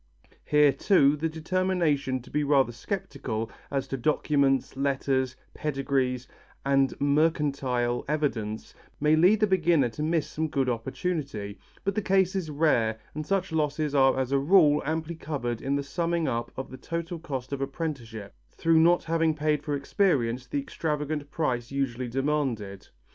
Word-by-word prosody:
Here, 150 -1 +5
too, 145 -1 +4
the 160 +2 -2
determination 160 -6 0
to - - -15
be 150 - +1
rather 140 -4 +3
sceptical 120 - -4 0.2
as 135 -1 -2
to 135 - -2
documents, 140 -1 +1
letters, 135 -1 0 0.2
pedigrees 135 -3 -1 0.4
and 135 -1 +2
mercantile 140 -5 +1
evidence 125 -8 -2 0.3
may 150 +1 +4
lead 185 +7 +4
the - - +6
beginner 170 -9 +3
to 115 - -7
miss 160 0 +1
some 160 +1 -2
good 135 -3 0
opportunity, 120 - -3 0.2
but 200 - 0
the 215 - -1
case 190 -1 +2
is 180 -5 -2
rare 140 -8 +2 0.2
and 155 0 -5
such 190 -2 0
losses 150 -1 0
are 135 -1 +4
as 130 0 -1
a 140 - +3
rule 150 -1 +5
amply 160 +1 -2
covered 135 -8 -4
in 140 +1 0
the 140 - -1
summing 170 +2 -1
up 120 -2 -2
of 130 - -5
the 130 - -8
total 170 +2 -4
cost 135 -4 -5
of 140 - -3
apprenticeship, 135 - -5 0.2
through 165 -1 +2
not 175 +2 +4
having 165 -1 +1
paid 150 -1 0
for 145 -1 -2
experience 130 - 0
the 140 - -1
extravagant 150 0 -3
price 130 -6 -2
usually 130 -3 -2
demanded. 125 -7 -2
145 Hz, 155 wpm, -27 LUFS, 130-160 Hz, 0.4 s, the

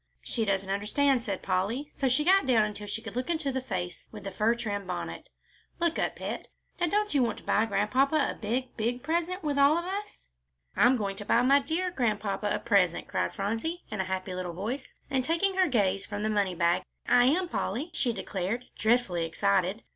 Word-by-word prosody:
"She 225 -3 -1
doesn't 195 -1 0
understand," 245 +7 +2
said 200 -4 -3
Polly, 210 +11 -1
so 270 - +1
she 260 +5 +3
got 380 -4 +5
down 225 -4 +4
until 210 0 -6
she 225 +3 -4
could 225 -2 -7
look 250 +5 -2
into 315 -5 0
the 260 0 -2
face 180 -8 -5
within - - -9
the 195 -1 -6
fur 225 +2 +3
trimmed 205 -4 -4
bonnet. 180 - -5 0.5
"Look 340 -1 +1
up, - - 0
pet; - - -5 0.3
now 350 - +2
don't 420 +2 +1
you 280 - +4
want 240 - 0
to - - -11
buy 220 +2 +2
Grandpapa 225 +8 +2 0.2
a - - -5
big, 240 +4 -3
big 240 +3 -1
present 340 +5 -1
with 290 -2 0
all 285 +3 +6
of 345 - -2
us?" 400 - -6 0.5
"I'm 250 +1 +5
going 200 -3 -3
to 205 - -7
buy 235 - +3
my 275 +2 +6
dear 335 +6 -1
Grandpapa 210 - -1
a - - +1
present," 190 -6 +2
cried - - -1
Phronsie, 225 - -2
in 215 -2 -1
a - - -3
happy 185 0 -3
little 180 -1 -4
voice, 225 +10 -4 0.2
and, 265 -1 +1
taking 335 +7 +1
her 375 -1 +3
gaze 195 -6 +1
from 205 0 -5
the 215 - +1
money 200 -3 +1
bag, 170 +1 +2 0.3
"I 245 0 +6
am, 350 +8 +3
Polly," 295 - -2
she 250 -6 +1
declared, 200 +3 -3
dreadfully 220 -7 +2
excited. 195 +4 +1
230 Hz, 210 wpm, -29 LUFS, 200-280 Hz, 0.5 s, all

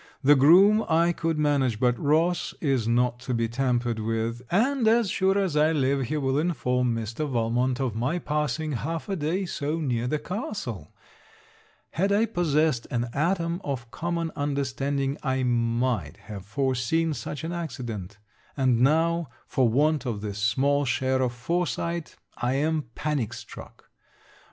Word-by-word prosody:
The 145 +2 +7
groom 190 +10 +6
I 170 +2 +4
could 165 -1 -1
manage, 140 -7 +1
but 125 -1 +3
Ross 165 +4 +1
is 135 -7 0
not 120 +1 +1
to 125 0 -3
be 115 0 +1
tampered 120 -1 0
with; 115 +2 -2
and 240 +5 +2
as 225 -3 +3
sure 195 0 +2
as 190 -6 0
I 155 +2 +4
live, 135 -2 +1
he 155 - -1
will 135 -1 +1
inform 125 -7 0
Mr. 115 +7 -3
Valmont 120 +1 0
of 130 -5 -1
my 125 +10 -1
passing 150 -1 -2
half 160 - -3
a 195 - 0
day 175 +4 -1
so 155 -2 -2
near 125 -6 -1
the 155 - 0
castle. 150 - -5 1.0
Had 195 +5 0
I 210 +3 +3
possessed 155 - +1
an 120 -1 -1
atom 170 +3 0
of 120 -5 -4
common 170 +5 -2
understanding, 140 0 -1
I 130 -2 0
might 115 - 0
have 100 -3 -9
foreseen 135 +7 0
such 145 +1 -6
an 165 - -3
accident; 120 - -5 0.4
and 130 -3 +2
now, 165 +3 +2 0.2
for 130 -3 +2
want 145 +2 +2
of 110 -4 -3
this 105 -1 -5
small 135 +7 +2
share 130 +1 0
of 125 -2 +1
foresight, 170 +5 -2 0.2
I 125 +1 0
am 155 +2 0
panic 150 -7 -2
struck. - - -11
140 Hz, 155 wpm, -26 LUFS, 120-165 Hz, 1.0 s, The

